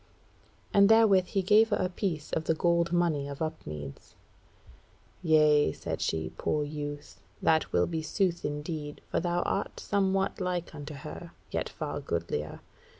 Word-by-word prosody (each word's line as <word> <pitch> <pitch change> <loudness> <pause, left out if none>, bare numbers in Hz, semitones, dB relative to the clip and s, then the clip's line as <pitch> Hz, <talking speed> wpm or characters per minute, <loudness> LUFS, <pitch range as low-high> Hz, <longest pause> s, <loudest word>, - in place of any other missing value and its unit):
And 200 0 +6
therewith 215 -5 +6
he 195 +1 0
gave 215 +4 +5
her 205 - +2
a 185 - +1
piece 180 -4 -3
of 160 - -1
the 160 - +2
gold 170 +1 +2
money 170 -5 +1
of 140 -1 -7
Upmeads. 75 - -6 1.1
"Yea," 150 - +4
said - - -5
she, 80 -1 -1
"poor 150 - 0
youth; 145 0 -6 0.2
that 160 -1 +2
will - - +3
be 165 -2 -3
sooth 175 +1 0
indeed, 150 0 -4
for - - +1
thou 175 +1 0
art 195 - -2
somewhat 195 -1 0
like 180 -2 -2
unto 150 0 -7
her, 155 +4 -9 0.2
yet - - -2
far - - -4
goodlier. 80 -3 -3
160 Hz, 150 wpm, -29 LUFS, 145-185 Hz, 1.1 s, And